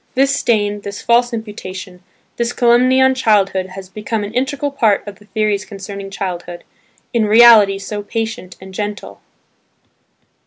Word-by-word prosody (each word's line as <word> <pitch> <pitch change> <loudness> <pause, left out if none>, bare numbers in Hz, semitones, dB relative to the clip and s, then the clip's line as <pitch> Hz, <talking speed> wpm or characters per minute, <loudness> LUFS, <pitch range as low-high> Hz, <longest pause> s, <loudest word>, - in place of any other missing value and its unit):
This 275 +2 +3
stain, 205 -2 0
this 200 0 -7
false 240 +1 +2
imputation, 190 -5 -7 0.4
this 235 0 -1
calumny 250 +2 +3
on 265 0 +5
childhood 200 -6 +1
has 190 0 -10
become 210 +2 -4
an 205 +2 -6
integral 275 +3 -1
part 220 -7 +1
of 200 -2 -9
the 210 - -19
theories 210 -1 -1
concerning 200 -1 -8
childhood, 175 -3 -6 0.5
in 230 -2 +2
reality 215 -3 +7
so 205 +1 -5
patient 220 -3 -5
and 190 0 -12
gentle. 205 +1 -6
210 Hz, 145 wpm, -17 LUFS, 195-235 Hz, 0.5 s, reality